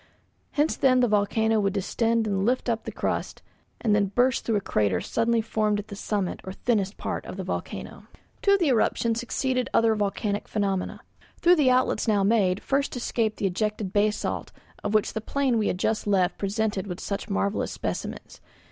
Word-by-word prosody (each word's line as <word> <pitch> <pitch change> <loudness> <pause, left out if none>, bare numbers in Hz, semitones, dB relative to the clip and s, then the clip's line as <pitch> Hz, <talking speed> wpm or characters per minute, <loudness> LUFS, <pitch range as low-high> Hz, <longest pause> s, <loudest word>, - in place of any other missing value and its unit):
Hence 295 +2 +2
then 255 -2 +4
the 245 - +4
volcano 220 +1 +2
would 195 -2 +1
distend 225 +3 0
and 195 -2 0
lift 245 +3 +1
up 225 -1 -1
the - - -4
crust, - - -3 0.4
and 220 -3 +1
then 205 -1 +3
burst 245 +5 +2
through 225 - +1
a - - +3
crater 105 - +1
suddenly 230 - +1
formed 215 -1 0
at 205 +1 -6
the 200 - -6
summit 200 -2 -2
or 190 - -6
thinnest 205 -3 0
part - - -3
of - - -7
the - - -3
volcano. - - -6 0.3
To 400 0 +5
the 340 -6 +2
eruption 230 -1 +2
succeeded 255 +2 -1
other 225 -1 +4
volcanic 205 0 -1
phenomena. 195 -3 -2 0.4
Through 350 +1 +5
the 285 -4 +4
outlets 255 -1 +2
now 205 -3 +3
made 195 -3 +2
first 275 0 0
escaped 230 -2 -1
the - - -2
ejected 210 +1 -1
basalt 210 +1 0 0.3
of 210 +1 -1
which 215 - +2
the 220 - -3
plain 260 -1 0
we 210 - +1
had - - 0
just 215 +3 -1
left 190 -3 +2
presented 200 -2 -2
such 200 +1 -4
marvellous 200 +1 0
specimens. - - -5
215 Hz, 185 wpm, -26 LUFS, 200-235 Hz, 0.4 s, To